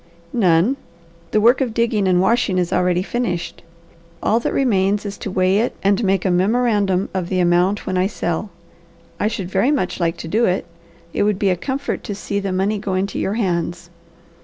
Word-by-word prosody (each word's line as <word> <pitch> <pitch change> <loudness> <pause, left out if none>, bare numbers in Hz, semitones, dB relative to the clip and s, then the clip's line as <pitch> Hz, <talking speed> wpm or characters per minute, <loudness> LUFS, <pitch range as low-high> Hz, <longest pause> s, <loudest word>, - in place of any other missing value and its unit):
"None. 190 +3 +3 0.5
The 215 - +2
work 240 +5 +4
of 240 -4 -1
digging 225 -4 +1
and 180 -1 +3
washing 200 0 +2
is 180 -1 0
already 180 0 +2
finished. 195 -6 -3 0.6
All 225 - +3
that - - -2
remains 205 -5 +1
is 200 -1 -4
to - - -5
weigh 185 +1 +2
it 235 - -1
and 200 +3 +2
make 195 -1 +1
a 185 - +2
memorandum 200 0 +1
of 180 -2 -2
the 185 - 0
amount 180 +3 +2
when 185 -1 -1
I 185 - +2
sell. 185 0 -3 0.7
I 210 - +1
should 195 -4 -4
very 195 +7 +2
much 195 -13 -1
like 165 -1 0
to - - -7
do 220 +8 +2
it. 185 -1 0 0.5
It - - -1
would 205 -1 +2
be 195 -1 +2
a - - +2
comfort 270 +9 -3
to 205 - -4
see 200 0 -3
the 195 -1 -3
money 195 +3 0
go 195 -2 -2
into 190 +1 -1
your 195 - -1
hands. 175 -4 -2
195 Hz, 200 wpm, -20 LUFS, 180-215 Hz, 0.7 s, work